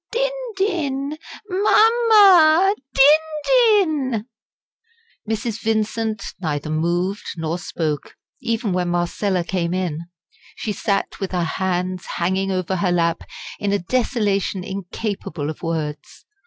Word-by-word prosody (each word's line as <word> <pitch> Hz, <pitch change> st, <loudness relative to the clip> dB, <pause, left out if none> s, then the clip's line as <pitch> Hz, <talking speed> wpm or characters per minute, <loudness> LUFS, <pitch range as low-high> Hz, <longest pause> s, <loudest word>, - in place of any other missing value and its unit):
din -, -, +1 dB, 0.3 s
din! 305 Hz, -7 st, -1 dB, 0.5 s
Máma! 405 Hz, -7 st, +6 dB, 0.2 s
din 290 Hz, +4 st, +6 dB, 0.2 s
din!" 325 Hz, -, +3 dB, 1.0 s
Mrs. 225 Hz, 0 st, -2 dB
Vincent 220 Hz, -1 st, -1 dB, 0.2 s
neither 155 Hz, -3 st, -3 dB
moved 175 Hz, +5 st, 0 dB, 0.2 s
nor 165 Hz, +2 st, -2 dB
spoke, 155 Hz, -5 st, -3 dB, 0.3 s
even 230 Hz, -4 st, -1 dB
when 180 Hz, -1 st, 0 dB
Marcella 175 Hz, +2 st, 0 dB
came 175 Hz, -1 st, -2 dB
in. 170 Hz, -3 st, -3 dB, 0.5 s
She 215 Hz, -, -3 dB
sat 200 Hz, 0 st, -2 dB
with 195 Hz, -1 st, -4 dB
her 180 Hz, -1 st, +1 dB
hands 180 Hz, +1 st, -2 dB
hanging 190 Hz, +3 st, 0 dB
over 185 Hz, 0 st, -1 dB
her 180 Hz, 0 st, +1 dB
lap 170 Hz, -1 st, +1 dB, 0.4 s
in 205 Hz, -1 st, -1 dB
a 205 Hz, -, +2 dB
desolation 200 Hz, -3 st, -1 dB
incapable 190 Hz, -5 st, -4 dB
of 155 Hz, -, -12 dB
words. 155 Hz, -3 st, -4 dB
195 Hz, 115 wpm, -21 LUFS, 175-270 Hz, 1.0 s, Máma